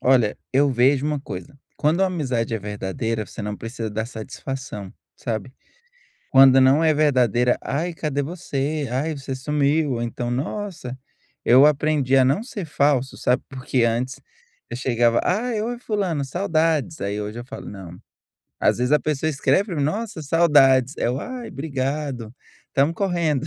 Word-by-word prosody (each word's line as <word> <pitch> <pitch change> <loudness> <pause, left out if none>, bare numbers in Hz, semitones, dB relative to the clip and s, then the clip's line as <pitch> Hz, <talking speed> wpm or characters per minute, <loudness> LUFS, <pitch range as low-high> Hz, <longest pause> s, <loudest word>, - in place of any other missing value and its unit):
Olha, 125 -5 +3 0.2
eu 140 +1 +4
vejo 130 +3 +3
uma 150 -2 -1
coisa, 140 +5 -8 0.2
quando 160 +6 +2
a - - +4
amizade 130 -10 -1
é - - -1
verdadeira, 105 +2 -3
você 110 - -8
não 105 0 -4
precisa 115 -1 -5
dar 110 +2 -3
satisfação, 110 -3 -7 0.2
sabe, 115 +2 -4 0.8
quando 135 0 +7
não 135 +5 +5
é 155 - +5
verdadeira: 125 -5 +3
"Ai, 165 +5 -2
cadê 150 -3 -2
você?" 150 -3 -3
"Ai, 145 +6 -1
você 135 -1 -5
sumiu." 145 +2 +1
Ou 120 -1 -2
então: 120 +1 -3
"Nossa." 135 -1 -4 0.5
Eu 130 +4 +7
aprendi 150 -2 +2
a 130 - +6
não 140 - +1
ser 235 -6 -6
falso, 140 -3 +1
sabe, 125 - +1
porque 130 -2 -1
antes 120 +3 -1 0.5
eu - - -4
chegava: 120 -2 +2
"Ai, 215 +3 0
oi 240 +1 -3
fulano, 195 - -1
saudades." 160 -1 0
Aí 100 +1 -2
hoje 105 +3 -5
eu 120 - -6
falo: - - -9
"Não." 90 -3 -9 0.6
Às - - +3
vezes 125 +1 0
a 150 - +6
pessoa 155 +1 -1
escreve 140 +5 +2
para 180 - -5
mim: 145 - 0
"Nossa, 210 +2 -3
saudades". 140 -4 +4
É - - +1
o: 130 +3 -2
"Ai, 250 -1 -6
brigado, 135 -4 -3 0.3
estamos 145 +5 +1
correndo." 170 -7 0
135 Hz, 165 wpm, -23 LUFS, 120-155 Hz, 0.8 s, quando